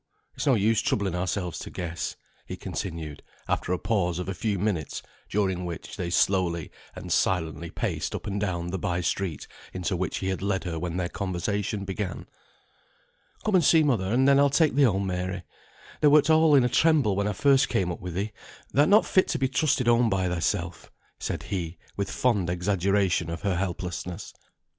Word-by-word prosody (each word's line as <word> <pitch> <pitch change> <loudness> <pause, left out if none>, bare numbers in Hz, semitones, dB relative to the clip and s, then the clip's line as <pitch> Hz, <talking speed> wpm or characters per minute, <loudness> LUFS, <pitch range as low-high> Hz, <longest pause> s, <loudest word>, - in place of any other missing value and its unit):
It's - - -4
no 135 - +5
use 110 +1 +2
troubling 100 -4 0
ourselves 90 -1 -2
to - - -7
guess," 85 -1 -4 0.3
he - - -6
continued, 80 -5 -5 0.3
after - - -1
a 90 - +2
pause 90 -5 0
of 90 - -4
a 95 - -2
few 100 +2 -1
minutes, 90 -5 -2 0.3
during 95 -3 0
which 85 -2 -6
they 90 -2 -3
slowly 85 -2 +1 0.2
and - - -7
silently 85 -2 0
paced - - -3
up - - -6
and 100 0 -2
down 85 -4 -2
the 95 - -3
by 90 0 -1
street, 90 -3 -2 0.3
into 90 +1 -2
which 90 -1 -2
he 95 - -2
had 95 - -2
led 95 -1 -1
her 85 -3 -3
when 90 +1 -3
their 90 -1 0
conversation 100 +2 -2
began. 95 -1 -4 1.2
"Come 215 - +1
and 180 -3 +5
see 160 +1 +5
mother, 110 -10 +1
and 130 +3 +3
then 140 0 +6
I'll 140 0 +5
take 155 +2 +3
thee 145 - +2
home, 100 -7 +3
Mary. 90 0 -3 0.6
Thou 150 - +6
wert 150 +2 +5
all 160 -1 +6
in 135 - +6
a - - +3
tremble 145 -6 +3
when 100 +1 0
first 135 +5 +4
I - - -7
came 90 -2 +1
up - - -6
with 90 -2 -6
thee; 100 +3 -2 0.4
thou'rt 145 +2 +4
not 210 +2 +6
fit 185 - +3
to 160 - -1
be 135 -2 +1
trusted 135 -1 +1
home 120 0 +4
by 95 -2 +1
thyself," 90 0 -2 0.3
said - - -3
he, 90 -3 -4 0.2
with 100 -1 -2
fond 105 -9 +1
exaggeration 95 -1 +1
of 85 - -5
her 100 -3 +1
helplessness. 90 -1 -4
95 Hz, 195 wpm, -26 LUFS, 90-115 Hz, 1.2 s, then